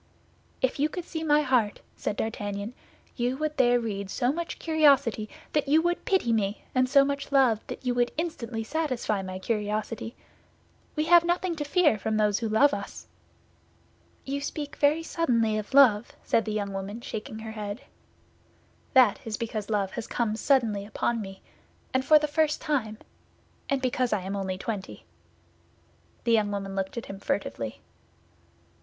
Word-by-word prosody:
"If 260 Hz, +1 st, +1 dB
you 295 Hz, +2 st, +2 dB
could 350 Hz, +2 st, -6 dB
see 320 Hz, -2 st, -5 dB
my 300 Hz, -1 st, +4 dB
heart," 245 Hz, -7 st, +1 dB, 0.2 s
said 205 Hz, -, -3 dB
D'Artagnan, 205 Hz, 0 st, -3 dB, 0.4 s
"you 245 Hz, +1 st, -1 dB
would 305 Hz, 0 st, -2 dB
there 245 Hz, -2 st, +4 dB
read 200 Hz, -4 st, -4 dB
so 245 Hz, +4 st, +1 dB
much 340 Hz, +1 st, -4 dB
curiosity 280 Hz, -9 st, +3 dB, 0.2 s
that 300 Hz, -2 st, +1 dB
you 300 Hz, +3 st, +5 dB
would 345 Hz, 0 st, -1 dB
pity 370 Hz, -12 st, +2 dB
me 205 Hz, -1 st, -1 dB
and 255 Hz, 0 st, +2 dB
so 275 Hz, 0 st, +6 dB
much 280 Hz, 0 st, -3 dB
love 260 Hz, -6 st, +4 dB
that -, -, -7 dB
you 250 Hz, -, +1 dB
would 245 Hz, 0 st, +1 dB
instantly 245 Hz, -9 st, -3 dB
satisfy 255 Hz, -7 st, -1 dB
my 185 Hz, -1 st, -5 dB
curiosity. 215 Hz, +3 st, -3 dB, 0.8 s
We 305 Hz, -, +1 dB
have 340 Hz, +1 st, +6 dB
nothing 350 Hz, 0 st, 0 dB
to 295 Hz, -, -2 dB
fear 295 Hz, -, +3 dB
from 220 Hz, +1 st, -1 dB
those 210 Hz, -1 st, +2 dB
who 230 Hz, -2 st, -2 dB
love 275 Hz, +7 st, +4 dB
us." 200 Hz, 0 st, -6 dB, 1.2 s
"You 280 Hz, +1 st, -3 dB
speak 290 Hz, +1 st, -5 dB
very 300 Hz, +3 st, +3 dB
suddenly 235 Hz, -11 st, +1 dB
of 210 Hz, -, -7 dB
love, 245 Hz, -6 st, +6 dB
monsieur," -, -, -29 dB
said 225 Hz, -, +2 dB
the 215 Hz, -, -2 dB
young 200 Hz, -2 st, -2 dB
woman, 195 Hz, +4 st, -5 dB
shaking 220 Hz, -1 st, -6 dB
her 220 Hz, 0 st, -7 dB
head. 210 Hz, +2 st, -5 dB, 1.1 s
"That 250 Hz, -6 st, +6 dB
is 220 Hz, -2 st, -4 dB
because 220 Hz, -3 st, -4 dB
love 200 Hz, -3 st, 0 dB
has 230 Hz, +1 st, -5 dB
come 225 Hz, -3 st, -1 dB
suddenly 225 Hz, -5 st, +2 dB
upon 220 Hz, +2 st, -1 dB
me, 195 Hz, -1 st, -9 dB, 0.5 s
and 260 Hz, 0 st, +2 dB
for 305 Hz, +3 st, +7 dB
the 300 Hz, 0 st, +1 dB
first 305 Hz, 0 st, +1 dB
time; 255 Hz, -9 st, -1 dB, 0.7 s
and 275 Hz, -1 st, 0 dB
because 250 Hz, -1 st, +1 dB
I 210 Hz, -, 0 dB
am 190 Hz, +2 st, -4 dB
only 190 Hz, -1 st, -2 dB
twenty." 200 Hz, -1 st, -5 dB, 1.2 s
The 235 Hz, -, +1 dB
young 215 Hz, -2 st, +3 dB
woman 195 Hz, -1 st, -4 dB
looked 195 Hz, +3 st, -3 dB
at 235 Hz, -, -4 dB
him 195 Hz, 0 st, -8 dB
furtively. 115 Hz, -, -3 dB
235 Hz, 170 wpm, -27 LUFS, 210-285 Hz, 1.2 s, for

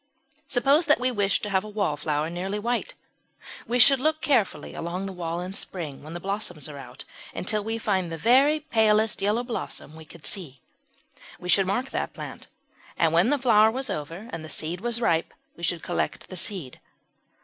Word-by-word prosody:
Suppose 280 Hz, +6 st, +4 dB
that 295 Hz, -4 st, +5 dB
we 255 Hz, +1 st, +1 dB
wished 200 Hz, -4 st, +1 dB
to 210 Hz, -, -2 dB
have 190 Hz, -1 st, +2 dB
a 215 Hz, -, -8 dB
Wallflower 155 Hz, -6 st, -1 dB
nearly 190 Hz, +4 st, -3 dB
white. 240 Hz, -, -2 dB, 0.7 s
We 245 Hz, -, +1 dB
should 270 Hz, +2 st, +7 dB
look 310 Hz, +3 st, +2 dB
carefully 255 Hz, -11 st, +1 dB
along 180 Hz, +3 st, -4 dB
the 195 Hz, -, -5 dB
wall 170 Hz, -1 st, -3 dB
in 185 Hz, +1 st, -5 dB
spring, 165 Hz, -8 st, -5 dB
when 155 Hz, +2 st, -9 dB
the 175 Hz, -, -4 dB
blossoms 195 Hz, -6 st, -3 dB
are 145 Hz, -2 st, -8 dB
out, 130 Hz, 0 st, -10 dB, 0.3 s
until 210 Hz, +3 st, 0 dB
we 225 Hz, +2 st, -2 dB
found 190 Hz, -6 st, 0 dB
the 165 Hz, -, -4 dB
very 270 Hz, -, +5 dB
palest 220 Hz, -7 st, +2 dB
yellow 210 Hz, +4 st, +1 dB
blossom 230 Hz, -, -5 dB
we 160 Hz, 0 st, -11 dB
could 160 Hz, 0 st, -13 dB
see. 150 Hz, -10 st, -5 dB, 0.8 s
We 180 Hz, -, -7 dB
should 190 Hz, +1 st, +4 dB
mark 245 Hz, +7 st, -1 dB
that -, -, -2 dB
plant, -, -, -8 dB, 0.5 s
and 165 Hz, -1 st, +3 dB
when 175 Hz, +8 st, +4 dB
the 290 Hz, -, +3 dB
flower 220 Hz, -5 st, +5 dB
was 255 Hz, 0 st, -2 dB
over 165 Hz, +7 st, -5 dB
and 165 Hz, -1 st, -5 dB
the 155 Hz, -, -8 dB
seed 170 Hz, +4 st, -3 dB
was 235 Hz, 0 st, -1 dB
ripe, 165 Hz, -7 st, +1 dB, 0.2 s
we -, -, -14 dB
should 170 Hz, 0 st, -1 dB
collect 175 Hz, -, -2 dB
the 185 Hz, -, -7 dB
seed. 175 Hz, -7 st, -3 dB
195 Hz, 195 wpm, -26 LUFS, 165-235 Hz, 0.8 s, should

